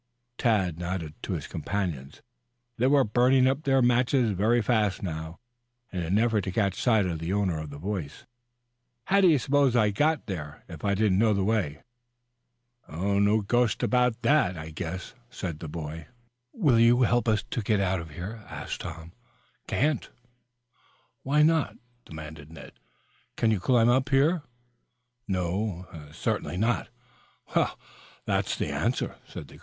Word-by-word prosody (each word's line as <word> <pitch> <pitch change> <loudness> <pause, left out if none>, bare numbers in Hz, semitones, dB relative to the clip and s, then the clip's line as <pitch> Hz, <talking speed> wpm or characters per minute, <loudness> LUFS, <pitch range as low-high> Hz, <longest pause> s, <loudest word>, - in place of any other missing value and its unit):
Tad 95 -8 +1
nodded 85 -3 -4
to - - -4
his - - -4
companions. 80 -9 -4 0.5
They 125 +3 +2
were 140 0 +5
burning 125 +4 +3
up 135 +3 +1
their 135 -2 +3
matches 125 -1 +3
very 110 +5 +2
fast 105 -4 +1
now 80 -2 -5 0.6
in 90 - -2
an 85 +4 0
effort 110 -2 +2
to 95 - -2
catch 100 -1 0
sight 110 -5 +3
of 85 -3 -2
the 80 +2 -3
owner 95 -5 0
of 80 -1 -6
the 70 - -9
voice. 90 -3 -5 0.8
"How 200 +1 +3
did 185 - +6
you 155 - +5
suppose 140 -1 +2
I 110 -3 +4
got 150 +8 +1
there 75 -6 -6
if 85 -4 -10
I 100 0 +1
didn't 100 -2 +2
know 110 -1 +3
the 100 - 0
way?" 95 -9 -1 1.1
"No 100 +5 +2
ghost 120 +3 +1
about 125 -2 +1
that, 115 - +3
I 80 0 -7
guess," 85 +3 -6 0.2
said 85 -10 -5
the 80 - -6
boy. 80 0 -6 0.4
"Will 145 - +3
you 120 +2 +5
help 120 0 +2
us 110 -1 +2
to 120 - -1
get 105 0 +1
out 95 -1 +1
of 80 -1 -8
here?" 100 +8 -7
asked - - -6
Tom. 85 0 -8 0.6
"Can't." 150 -1 0 1.1
"Why 150 +3 +3
not?" 160 -1 +2 0.3
demanded 80 -1 -10
Ned. 80 -4 -11 0.7
"Can 115 - +2
you 105 - +1
climb 120 +3 +3
up 130 +2 +2
here?" 150 +5 +3 0.9
"No, 95 0 -2 0.3
certainly 85 - -2
not." 115 +5 0 0.7
"Well, - - +1 0.5
that's - - 0
the - - -2
answer." - - -1
105 Hz, 155 wpm, -27 LUFS, 85-120 Hz, 1.1 s, did